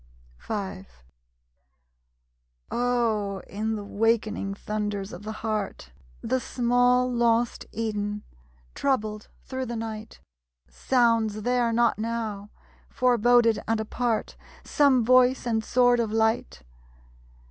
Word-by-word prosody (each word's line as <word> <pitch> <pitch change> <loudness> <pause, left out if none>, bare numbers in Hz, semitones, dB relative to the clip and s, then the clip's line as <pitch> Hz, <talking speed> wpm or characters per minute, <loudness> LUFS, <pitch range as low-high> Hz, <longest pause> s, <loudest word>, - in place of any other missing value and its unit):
V 195 -3 -5 1.9
Oh, 225 -5 0
in 220 +2 -3
the 210 - -5
wakening 215 -1 0
thunders 205 -1 -4
of - - -8
the 215 +1 -6
heart, 210 - -3 0.3
The 260 +2 0
small 245 0 +2
lost 235 0 +1
Eden, 210 -2 -3 0.5
troubled 215 -6 -1 0.2
through 260 -1 -4
the 235 - -4
night, 220 -1 -6 0.5
Sounds 225 - +1
there 245 -1 +1
not 230 -2 +2
now, 220 -3 -3 0.4
forboded 240 -2 +3
and 225 0 +1
apart, 225 +1 -2 0.3
Some 270 -6 +3
voice 255 +1 +4
and 225 -2 0
sword 245 +1 +3
of 225 -2 -1
light? 220 - 0
225 Hz, 105 wpm, -26 LUFS, 210-245 Hz, 1.9 s, voice